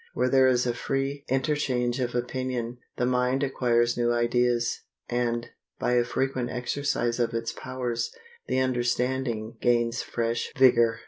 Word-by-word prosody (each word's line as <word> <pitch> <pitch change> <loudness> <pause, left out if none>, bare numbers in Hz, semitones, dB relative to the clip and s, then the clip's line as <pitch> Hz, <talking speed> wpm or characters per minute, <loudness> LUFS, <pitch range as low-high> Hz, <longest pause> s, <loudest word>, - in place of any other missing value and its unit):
Where 125 +1 +2
there 130 0 +5
is 125 -1 +3
a 120 - +1
free 135 +3 -2
interchange 130 -2 0
of 125 -1 -2
opinion, 125 -1 -2 0.2
the 125 - +1
mind 125 +2 +1
acquires 120 -3 +2
new 120 0 +1
ideas, 120 0 +1 0.3
and, 120 -1 -1 0.3
by - - 0
a 120 -1 +4
frequent 125 0 -1
exercise 125 -1 -1
of 115 -1 0
its 115 0 -2
powers, 125 -3 -3 0.4
the - - 0
understanding 120 -2 -1
gains 120 -1 +2
fresh 115 0 -2
vigor. 120 -3 +5
125 Hz, 140 wpm, -27 LUFS, 120-130 Hz, 0.4 s, there